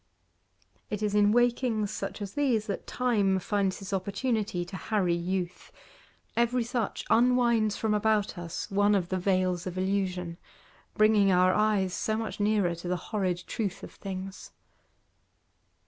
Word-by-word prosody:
It 210 Hz, 0 st, -3 dB
is 210 Hz, -1 st, 0 dB
in 205 Hz, 0 st, +4 dB
wakings 240 Hz, -3 st, +2 dB
such 215 Hz, -, -4 dB
as 200 Hz, -1 st, -7 dB
these 250 Hz, -7 st, +1 dB
that 200 Hz, -, -5 dB
Time 210 Hz, -6 st, +1 dB
finds 195 Hz, 0 st, 0 dB
his 195 Hz, 0 st, -7 dB
opportunity 200 Hz, -1 st, -1 dB
to 175 Hz, -, -9 dB
harry 190 Hz, -3 st, 0 dB
youth; 180 Hz, +1 st, -3 dB, 0.6 s
every 235 Hz, +1 st, +2 dB
such 235 Hz, -2 st, -3 dB
unwinds 235 Hz, -2 st, +3 dB
from 220 Hz, -1 st, 0 dB
about 210 Hz, -1 st, +1 dB
us 175 Hz, 0 st, -6 dB
one 205 Hz, +1 st, +3 dB
of 180 Hz, -3 st, 0 dB
the 185 Hz, -, -1 dB
veils 185 Hz, -1 st, 0 dB
of 185 Hz, 0 st, -5 dB
illusion, 185 Hz, -3 st, -1 dB, 0.6 s
bringing 215 Hz, -2 st, +5 dB
our 185 Hz, 0 st, +4 dB
eyes 210 Hz, -4 st, +2 dB
so 215 Hz, 0 st, -1 dB
much 225 Hz, -1 st, -4 dB
nearer 205 Hz, -4 st, +2 dB
to 170 Hz, +1 st, -7 dB
the 180 Hz, 0 st, 0 dB
horrid 185 Hz, -4 st, -1 dB
truth 200 Hz, -5 st, -3 dB
of -, -, -8 dB
things. 190 Hz, 0 st, -7 dB
200 Hz, 145 wpm, -28 LUFS, 185-220 Hz, 0.6 s, bringing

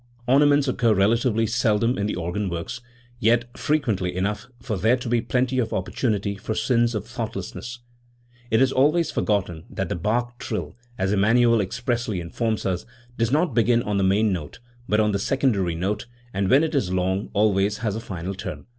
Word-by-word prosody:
Ornaments 145 Hz, +2 st, +4 dB
occur 120 Hz, -3 st, +2 dB
relatively 115 Hz, +3 st, +2 dB
seldom 115 Hz, +1 st, +1 dB
in 100 Hz, 0 st, -1 dB
the -, -, -2 dB
organ 95 Hz, +4 st, -2 dB
works, 85 Hz, +8 st, -5 dB, 0.4 s
yet 120 Hz, 0 st, +2 dB
frequently 110 Hz, -, 0 dB
enough 100 Hz, +5 st, -2 dB
for 120 Hz, -3 st, -3 dB
there 110 Hz, +6 st, +3 dB
to 125 Hz, -, -7 dB
be 120 Hz, 0 st, +2 dB
plenty 130 Hz, +2 st, 0 dB
of 115 Hz, -3 st, 0 dB
opportun 105 Hz, +3 st, -1 dB
ities 100 Hz, 0 st, -4 dB
for 110 Hz, 0 st, -3 dB
sins 115 Hz, +1 st, +1 dB
of 105 Hz, -, -3 dB
thoughtlessness*. 120 Hz, 0 st, -6 dB, 0.7 s
It 115 Hz, +4 st, +4 dB
is 130 Hz, -, +2 dB
always 155 Hz, +5 st, +2 dB
forgotten 95 Hz, -7 st, -1 dB
that 95 Hz, -3 st, -3 dB
the -, -, -1 dB
Bach 120 Hz, +7 st, -1 dB
trill, 110 Hz, -, -4 dB, 0.2 s
as 95 Hz, -3 st, 0 dB
Emmanuel 115 Hz, +3 st, +4 dB
expressly 120 Hz, 0 st, -2 dB
informs 110 Hz, +6 st, -2 dB
us, 90 Hz, -2 st, -1 dB, 0.3 s
does 115 Hz, 0 st, 0 dB
not 160 Hz, +5 st, +2 dB
begin 120 Hz, 0 st, +3 dB
on 105 Hz, -1 st, -1 dB
the -, -, +2 dB
main 100 Hz, +2 st, +3 dB
note 75 Hz, -5 st, -5 dB, 0.3 s
but 105 Hz, -, +3 dB
on 105 Hz, 0 st, +3 dB
the 100 Hz, -, 0 dB
secondary 100 Hz, -8 st, +1 dB
note, 95 Hz, +7 st, -2 dB, 0.3 s
and, 95 Hz, -1 st, 0 dB
when 140 Hz, +4 st, +5 dB
it 160 Hz, -, -1 dB
is 125 Hz, -11 st, 0 dB
long, 95 Hz, +2 st, -1 dB
always 105 Hz, 0 st, +2 dB
has 105 Hz, -2 st, -2 dB
a -, -, -3 dB
final 95 Hz, -3 st, -5 dB
turn. 95 Hz, -, -7 dB
110 Hz, 185 wpm, -24 LUFS, 100-120 Hz, 0.7 s, when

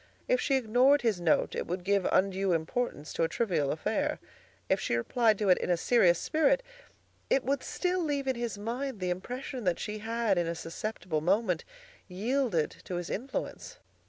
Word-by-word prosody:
If -, -, +2 dB
she 275 Hz, -, +2 dB
ignored 255 Hz, +3 st, +4 dB
his 215 Hz, -7 st, +1 dB
note 165 Hz, -2 st, +2 dB
it -, -, -3 dB
would 180 Hz, +1 st, -3 dB
give 200 Hz, 0 st, +2 dB
undue 190 Hz, -1 st, +2 dB
importance 165 Hz, -1 st, -2 dB
to -, -, -2 dB
a -, -, +3 dB
trivial 165 Hz, -9 st, 0 dB
affair. -, -, -1 dB, 0.5 s
If -, -, +2 dB
she -, -, -1 dB
replied 220 Hz, -, +2 dB
to 205 Hz, -1 st, 0 dB
it 180 Hz, -, +5 dB
in -, -, -3 dB
a 175 Hz, -, +3 dB
serious 180 Hz, -3 st, +4 dB
spirit 415 Hz, -, +2 dB, 0.7 s
it 270 Hz, -, +3 dB
would 275 Hz, +1 st, 0 dB
still 365 Hz, 0 st, -1 dB
leave 285 Hz, -3 st, -1 dB
in 265 Hz, -1 st, 0 dB
his 235 Hz, -3 st, -3 dB
mind 240 Hz, +3 st, -4 dB
the 180 Hz, -1 st, -1 dB
impression 245 Hz, +7 st, -5 dB
that 180 Hz, -2 st, +2 dB
she 215 Hz, 0 st, -4 dB
had 225 Hz, -3 st, 0 dB
in 170 Hz, -, 0 dB
a 170 Hz, -, -2 dB
susceptible 170 Hz, -1 st, -4 dB
moment 185 Hz, 0 st, +1 dB, 0.4 s
yielded 215 Hz, -, 0 dB
to 180 Hz, -, -4 dB
his 175 Hz, 0 st, -4 dB
influence. 265 Hz, +5 st, -5 dB
210 Hz, 185 wpm, -30 LUFS, 180-250 Hz, 0.7 s, it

